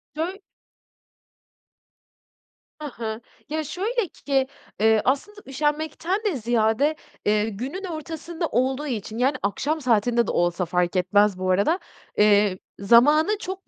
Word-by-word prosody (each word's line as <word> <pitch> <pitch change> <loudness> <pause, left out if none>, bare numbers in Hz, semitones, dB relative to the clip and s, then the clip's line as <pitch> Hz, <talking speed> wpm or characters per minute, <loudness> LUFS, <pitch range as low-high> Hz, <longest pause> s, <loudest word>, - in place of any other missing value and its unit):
Döy 350 +5 -3 2.4
Hı - - -5
hı, 225 -3 -5 0.3
ya, 315 +1 -2
şöyle 395 - -2 0.2
ki, 270 -2 +2 0.3
ııı, 220 -1 +4
aslında 375 +11 -1
üşenmekten 305 +6 -1
de 400 -7 +1
ziyade, 235 +5 +1 0.3
ııı, 210 +1 +2
günün 255 - -5
ortasında 325 0 -5
olduğu 265 +4 0
için, 220 -3 -4
yani, 260 +4 +2
akşam 290 +10 -1
saatinde 235 -1 +2
de - - 0
olsa 175 +1 +1
fark 180 +1 0
etmez 195 +2 +3
bu 185 0 -2
arada, 205 - +2 0.4
eee, 205 -2 +4 0.2
zamanı 295 - +5
çok 380 -1 -7
260 Hz, 125 wpm, -24 LUFS, 210-315 Hz, 2.4 s, zamanı